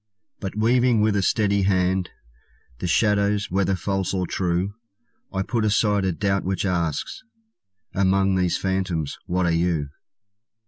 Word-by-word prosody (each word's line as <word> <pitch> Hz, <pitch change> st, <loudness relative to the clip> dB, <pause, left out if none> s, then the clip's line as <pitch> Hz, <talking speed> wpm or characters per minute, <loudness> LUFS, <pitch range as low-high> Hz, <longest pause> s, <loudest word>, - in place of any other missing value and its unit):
But 95 Hz, -2 st, -5 dB
weaving 120 Hz, +1 st, +3 dB
with 105 Hz, -1 st, +2 dB
a 100 Hz, -, +2 dB
steady 100 Hz, +1 st, +2 dB
hand 95 Hz, -1 st, +1 dB, 0.7 s
The -, -, -2 dB
shadows, 100 Hz, +2 st, +1 dB
whether 95 Hz, +1 st, +1 dB
false 95 Hz, +1 st, -2 dB
or 90 Hz, -1 st, 0 dB
true, 90 Hz, +2 st, -1 dB, 0.6 s
I 95 Hz, 0 st, -1 dB
put 115 Hz, +2 st, -1 dB
aside 105 Hz, -2 st, +2 dB
a 95 Hz, -, +1 dB
doubt 95 Hz, +4 st, 0 dB
which 95 Hz, 0 st, -1 dB
asks 85 Hz, -5 st, -2 dB, 0.7 s
"Among 95 Hz, 0 st, +2 dB
these 90 Hz, -2 st, +1 dB
phantoms 95 Hz, -6 st, -2 dB
what 90 Hz, 0 st, 0 dB
are 85 Hz, -, +2 dB
you?" 85 Hz, -4 st, 0 dB
95 Hz, 140 wpm, -23 LUFS, 90-100 Hz, 0.7 s, weaving